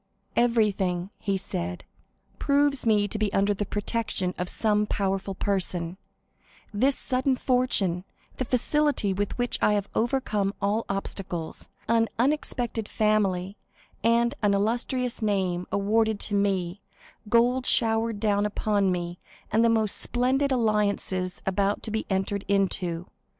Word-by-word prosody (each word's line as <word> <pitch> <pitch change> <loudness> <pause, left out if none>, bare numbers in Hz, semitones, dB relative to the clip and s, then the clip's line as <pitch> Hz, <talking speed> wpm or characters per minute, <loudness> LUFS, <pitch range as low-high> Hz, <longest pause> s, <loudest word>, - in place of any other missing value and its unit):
50153m - - +4
"Everything," 200 -6 +1
he 200 -1 -1
said, 90 - -3 0.6
"proves 280 -3 +2
me 210 -2 +4
to 215 - -4
be 210 -2 +1
under 200 +1 +3
the 205 0 -3
protection 205 -3 -2
of 180 0 -3
some 210 -1 +2
powerful 195 -1 -1
person,—this 195 +6 -3
sudden 260 +1 0
fortune, 245 -9 +1 0.3
the 255 - -1
facility 255 -3 +1
with 200 +1 -2
which 245 -1 0
I 210 - +4
have 205 -1 0
overcome 215 -5 0
all 205 +3 0
obstacles, 190 -4 -4 0.2
an 230 0 +3
unexpected 240 -4 0
family 200 -3 +1 0.5
and 235 +2 +3
an 205 -2 +3
illustrious 240 +4 -1
name 190 -4 0
awarded 215 +1 +1
to 205 - 0
me, 195 -2 0 0.5
gold 245 +3 +3
showered 225 -1 +2
down 205 -1 +2
upon 205 -2 +1
me, 175 0 -3 0.3
and 220 +2 +3
the 230 - +5
most 220 -2 +2
splendid 260 +3 +1
alliances 205 -6 0
about 200 +1 0
to 220 - -4
be 220 +1 -2
entered 195 +1 -1
into. 185 -3 0
210 Hz, 130 wpm, -26 LUFS, 195-230 Hz, 0.6 s, the